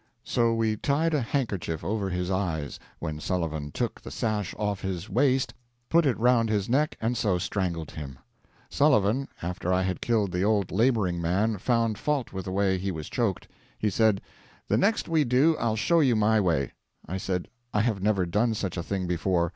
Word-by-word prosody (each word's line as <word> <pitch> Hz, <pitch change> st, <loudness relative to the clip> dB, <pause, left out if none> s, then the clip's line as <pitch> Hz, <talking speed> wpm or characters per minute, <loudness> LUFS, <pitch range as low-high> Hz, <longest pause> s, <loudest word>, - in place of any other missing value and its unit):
So 115 Hz, -2 st, +1 dB
we 110 Hz, -1 st, +1 dB
tied 155 Hz, +7 st, +1 dB
a 150 Hz, -, +2 dB
handkerchief 105 Hz, -, -2 dB
over 100 Hz, -2 st, -1 dB
his 90 Hz, 0 st, -2 dB
eyes, 85 Hz, -6 st, -2 dB, 0.2 s
when 80 Hz, -3 st, -4 dB
Sullivan 80 Hz, -4 st, -2 dB
took -, -, -3 dB
the -, -, -8 dB
sash 105 Hz, +6 st, -2 dB
off 105 Hz, -2 st, -2 dB
his 95 Hz, 0 st, -4 dB
waist, 135 Hz, -2 st, +2 dB, 0.4 s
put 170 Hz, -2 st, +4 dB
it 130 Hz, -, +1 dB
round 115 Hz, -1 st, +3 dB
his 105 Hz, -2 st, 0 dB
neck, 145 Hz, +5 st, +1 dB
and 115 Hz, +2 st, 0 dB
so 100 Hz, -6 st, +1 dB
strangled 90 Hz, -2 st, -2 dB
him. 70 Hz, -4 st, -7 dB, 0.5 s
Sullivan, 135 Hz, -2 st, +3 dB, 0.2 s
after 90 Hz, +1 st, -2 dB
I 90 Hz, 0 st, +2 dB
had 95 Hz, -1 st, -2 dB
killed 110 Hz, -5 st, +1 dB
the 90 Hz, +1 st, -1 dB
old 100 Hz, -2 st, +1 dB
laboring 105 Hz, -5 st, +2 dB
man, 100 Hz, +5 st, +1 dB
found 115 Hz, -1 st, +1 dB
fault 145 Hz, -6 st, -1 dB
with 95 Hz, -1 st, -5 dB
the 95 Hz, -, -4 dB
way 95 Hz, -1 st, +1 dB
he 95 Hz, +2 st, -2 dB
was 80 Hz, -5 st, -5 dB
choked. 110 Hz, -7 st, -1 dB, 0.3 s
He 105 Hz, -, 0 dB
said, 110 Hz, 0 st, +3 dB, 0.5 s
'The -, -, +3 dB
next 215 Hz, +3 st, +2 dB
we 160 Hz, -2 st, +3 dB
do 135 Hz, +6 st, +3 dB
I'll 115 Hz, -2 st, +1 dB
show 165 Hz, +10 st, +3 dB
you 130 Hz, -6 st, +4 dB
my 110 Hz, +1 st, +3 dB
way.' 80 Hz, -7 st, +1 dB, 0.4 s
I 95 Hz, -, -3 dB
said, 95 Hz, -2 st, -2 dB, 0.2 s
'I 105 Hz, -, +2 dB
have 110 Hz, -4 st, 0 dB
never 100 Hz, -2 st, +2 dB
done 110 Hz, +6 st, +1 dB
such 95 Hz, -4 st, -3 dB
a -, -, -1 dB
thing 95 Hz, +1 st, -3 dB
before. 85 Hz, 0 st, +1 dB
105 Hz, 195 wpm, -27 LUFS, 90-115 Hz, 0.5 s, put